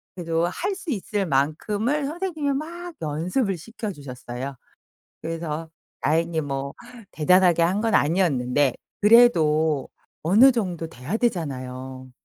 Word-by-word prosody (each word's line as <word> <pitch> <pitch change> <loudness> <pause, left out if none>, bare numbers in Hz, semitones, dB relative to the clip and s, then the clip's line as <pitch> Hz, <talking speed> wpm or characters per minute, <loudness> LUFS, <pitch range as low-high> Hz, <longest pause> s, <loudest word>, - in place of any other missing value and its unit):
그래도 165 -1 0
할 380 - -2
수 375 -3 -8
있을 205 -2 -2
만큼을 205 - 0
선생님이 315 -3 -2
막 340 +4 -6
연습을 180 - -1
시켜주셨어요. 140 - -7 0.7
그래서 165 -1 -4 0.3
다행히 165 +1 +1
뭐 140 -1 -4 0.4
대단하게 175 +1 +4
한 185 +5 +2
건 225 0 0
아니었는데 145 -5 +2 0.3
그래도 160 - +5 0.3
어느 220 - +6
정도 180 -8 -2
돼야 155 - -4
되잖아요. 130 - -3
170 Hz, 270 characters per minute, -24 LUFS, 145-225 Hz, 0.7 s, 어느